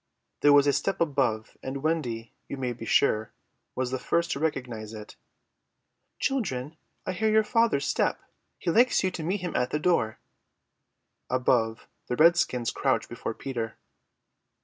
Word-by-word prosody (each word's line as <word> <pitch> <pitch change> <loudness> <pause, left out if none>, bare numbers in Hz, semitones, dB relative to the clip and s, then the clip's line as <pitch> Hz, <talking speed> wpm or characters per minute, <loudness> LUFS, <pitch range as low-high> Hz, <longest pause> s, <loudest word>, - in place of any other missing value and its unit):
There 145 - +5
was 145 0 +7
a 140 - +3
step 170 +7 -1
above, 135 -9 0
and 135 +1 -5
Wendy, 125 -8 -2 0.2
you 140 - -4
may 125 -2 -2
be 115 -1 -9
sure, 110 0 +2 0.4
was 130 -1 -1
the 130 - -2
first 170 +5 0
to - - -2
recognize 120 -8 -3
it. 105 -1 -10 1.0
"Children, 160 - -2 0.3
I - - -1
hear 215 +4 0
your 220 0 +4
father's 225 -10 +2
step. - - +1 0.4
He 170 - -1
likes 240 +4 +4
you 185 - +1
to 180 - -5
meet 185 +5 -1
him 180 - -4
at 125 0 +1
the - - 0
door." 150 -9 +1 1.1
Above, 120 -3 +1 0.2
the 125 - -1
redskins 155 -7 +3
crouched - - 0
before - - -5
Peter. 115 -4 -4
140 Hz, 155 wpm, -27 LUFS, 120-170 Hz, 1.1 s, was